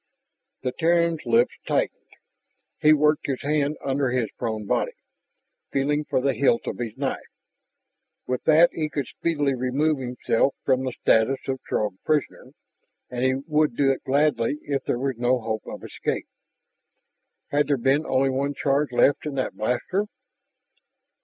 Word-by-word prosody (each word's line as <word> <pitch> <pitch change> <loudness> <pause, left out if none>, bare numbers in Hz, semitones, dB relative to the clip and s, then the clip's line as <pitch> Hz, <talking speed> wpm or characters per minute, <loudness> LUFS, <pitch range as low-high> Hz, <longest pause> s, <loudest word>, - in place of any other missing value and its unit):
The 125 - 0
Terran's 170 0 +1
lips 120 +1 +3
tightened. - - -1 0.7
He 155 - +5
worked 150 0 +3
his 135 -2 -3
hand 150 0 0
under 135 -1 +1
his 120 -4 -1
prone 110 -3 -4
body, - - 0 0.8
feeling 145 +2 0
for - - 0
the 135 +1 +1
hilt 120 -1 +2
of - - -4
his 115 -3 -4
knife. - - -1 1.1
With 125 0 -2
that 160 +2 +6
he 155 -2 -2
could 140 -3 -2
speedily 145 -3 -1
remove 135 +4 0
himself 125 +1 0
from 130 -1 +2
the 130 - -3
status 115 +5 +3
of 130 -1 -2
Throg 105 -3 -1
prisoner, 155 -2 -1 0.6
and 125 0 -2
he 130 0 +3
would 150 -4 +1
do 135 0 +3
it 135 - -3
gladly 145 -1 +1
if 140 -2 -2
there - - 0
was 135 -1 -2
no 125 +1 +2
hope 110 -1 -4
of - - -8
escape. - - -3 1.3
Had 145 -1 +2
there 145 - +2
been 135 +5 +2
only 135 0 +2
one 140 +2 -1
charge 140 0 +1
left 140 +4 +3
in 145 - -4
that 130 - -1
blaster? 125 - -1
135 Hz, 155 wpm, -24 LUFS, 125-150 Hz, 1.3 s, that